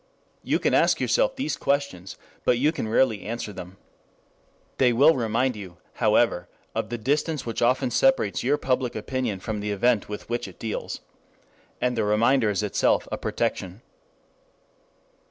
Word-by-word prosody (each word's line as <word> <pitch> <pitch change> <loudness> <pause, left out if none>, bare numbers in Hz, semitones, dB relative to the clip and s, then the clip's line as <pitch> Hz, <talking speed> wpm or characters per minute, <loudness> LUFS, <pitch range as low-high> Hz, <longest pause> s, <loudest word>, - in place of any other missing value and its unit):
You - - +1
can - - 0
ask - - +4
yourself - - +2
these 155 - -2
questions, 140 -10 -2 0.3
but 120 - +3
you 145 +5 +3
can 115 - -4
rarely 110 -1 +2
answer 110 -1 -5
them. 90 +1 -9 1.0
They 125 -2 +5
will 145 +7 +6
remind 120 +2 0
you, 95 -4 -9 0.2
however, 110 -5 +2 0.3
of - - -2
the 120 - -3
distance 145 +4 -1
which 115 -2 -3
often 125 +1 +2
separates 265 - +2
your 140 +4 +2
public 130 -2 -1
opinion 110 -3 -3
from 110 0 -3
the 105 +1 -3
event 105 +2 +1
with 105 - -6
which 120 +1 -2
it - - -13
deals. 110 -2 -4 0.8
And 125 0 0
the 110 - 0
reminder 110 +3 +3
is 105 0 -1
itself 105 - +1
a - - -2
protection. 95 +4 -3
120 Hz, 155 wpm, -25 LUFS, 105-130 Hz, 1.0 s, will